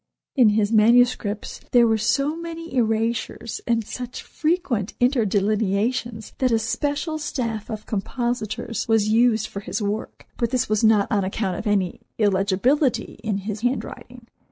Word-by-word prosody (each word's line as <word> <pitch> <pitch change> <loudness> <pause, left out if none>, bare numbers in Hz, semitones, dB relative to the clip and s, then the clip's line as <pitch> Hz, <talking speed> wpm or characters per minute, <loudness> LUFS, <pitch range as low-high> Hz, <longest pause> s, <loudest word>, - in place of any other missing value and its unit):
In 250 -6 +6
his 210 -1 +2
manuscripts 225 -1 +3
there 240 -1 +7
were 220 -1 +2
so 275 +8 +1
many 330 0 -7
erasures, 230 -1 -1
and 230 -2 +1
such 250 +2 -6
frequent 305 - -1
interlineations 220 -1 0
that 255 -2 +2
a 225 - +4
special 285 +8 -2
staff 230 -7 -3
of 215 -2 -6
compositors 230 +1 -3
was 220 -2 +3
used 225 -1 +3
for 200 - -6
his 200 - -4
work, 210 0 -4
but 235 - 0
this 255 -1 0
was 215 +1 0
not 215 -2 +5
on 205 -3 +2
account 190 -1 -2
of 220 - -5
any 195 -4 0 0.2
illegibility 215 +7 +1
in 210 -3 -1
his 210 0 -4
handwriting. 245 -1 -4
225 Hz, 145 wpm, -23 LUFS, 210-245 Hz, 0.2 s, there